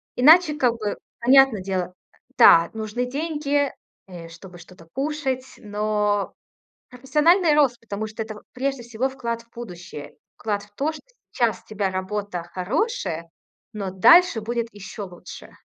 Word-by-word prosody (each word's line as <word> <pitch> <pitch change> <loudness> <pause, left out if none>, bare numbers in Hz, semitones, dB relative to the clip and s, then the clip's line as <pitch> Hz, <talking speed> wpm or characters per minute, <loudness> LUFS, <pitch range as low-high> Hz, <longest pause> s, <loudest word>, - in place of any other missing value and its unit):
иначе, 305 +4 +6
как 245 -4 +2
бы, 215 -3 -4 0.2
понятно 260 -4 +5
дело, 185 -1 -3 0.4
да, 165 0 +7
нужны 220 +3 -3
деньги, 290 0 -1 0.4
э, 175 -3 -10
чтобы 175 +1 -13
что-то 170 -1 -16
кушать. 270 -2 -2
Но 210 -1 -1 0.6
профессиональный 300 +7 +3
рост, 260 -5 +3
потому 215 -1 -5
что 220 +1 -5
это 215 -1 -8
в - - -25
прежде 270 0 -2
всего, 235 +2 -2
вклад 235 -3 -4
в 235 - -35
будущее. 175 -9 -9 0.2
Вклад 205 -2 -2
в 205 - -20
то, 295 +6 0
что 310 - -11 0.3
сейчас 235 -4 0
у - - -36
тебя 200 -3 -2
работа 190 -1 -3
хорошая, 185 - -3 0.4
но 200 -3 -4
дальше 245 - +6
будет 235 +1 -2
еще 205 +1 -8
лучше. 180 -3 -11
225 Hz, 145 wpm, -23 LUFS, 195-270 Hz, 0.6 s, да